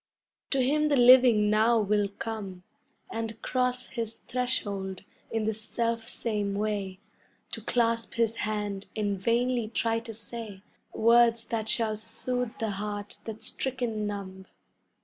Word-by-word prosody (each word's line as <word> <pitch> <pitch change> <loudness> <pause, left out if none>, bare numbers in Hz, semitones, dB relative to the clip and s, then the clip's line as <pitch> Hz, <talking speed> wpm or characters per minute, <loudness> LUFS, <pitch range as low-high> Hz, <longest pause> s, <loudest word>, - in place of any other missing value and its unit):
To 275 - +1
him 300 +4 +2
the 295 - +3
living 245 -4 +7
now 225 +2 +4
will 205 -1 +2
come 200 -3 -6 0.5
And 225 -1 -4
cross 250 -1 +1
his 230 -3 -3
threshold 205 -7 -3 0.3
in 225 -1 -1
the 220 +1 +1
self 230 +1 -2
same 210 -4 -2
way 200 -2 -2 0.5
To - - -4
clasp 230 -1 0
his 230 -1 +1
hand 210 -2 -3
and 205 -2 -1
vainly 235 +1 +1
try 225 0 0
to 225 0 -8
say 215 -2 -7 0.3
Words 230 0 +4
that 225 -2 -2
shall 220 -2 +2
soothe 230 +2 -3
the 220 -2 -1
heart 205 +1 -5
that's 220 0 -6
stricken 240 -5 -2
numb. 190 -2 -6
225 Hz, 135 wpm, -28 LUFS, 210-235 Hz, 0.5 s, living